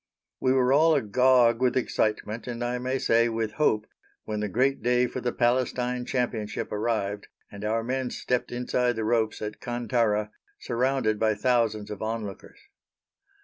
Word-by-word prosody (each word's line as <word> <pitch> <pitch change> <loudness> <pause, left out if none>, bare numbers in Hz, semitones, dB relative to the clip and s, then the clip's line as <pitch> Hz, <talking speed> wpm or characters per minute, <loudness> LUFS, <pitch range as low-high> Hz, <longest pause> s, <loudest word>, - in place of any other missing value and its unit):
We 130 - +2
were 130 0 +3
all 160 +2 +5
agog 125 -1 +3
with 130 0 +2
excitement, 110 -2 -1
and 120 -1 -4
I 120 +1 -1
may 130 +2 -1
say 115 -2 +3
with 110 -1 -2
hope, 110 -7 +2 0.4
when 105 -1 -4
the 105 0 -2
great 135 +6 +1
day 125 +2 +3
for 125 +1 -5
the 120 - -1
Palestine 125 0 0
Championship 120 -5 -2
arrived 105 -2 -2 0.2
and 100 0 -9
our 110 +2 0
men 130 +1 -2
stepped 125 0 -2
inside 125 0 0
the 110 -1 -2
ropes 110 -1 0
at 105 0 -6
Kantara, 115 -3 0 0.3
surrounded 120 -3 0
by 110 -1 +2
thousands 110 -2 0
of 105 - -7
onlookers. 110 -3 -5
120 Hz, 155 wpm, -26 LUFS, 110-125 Hz, 0.4 s, all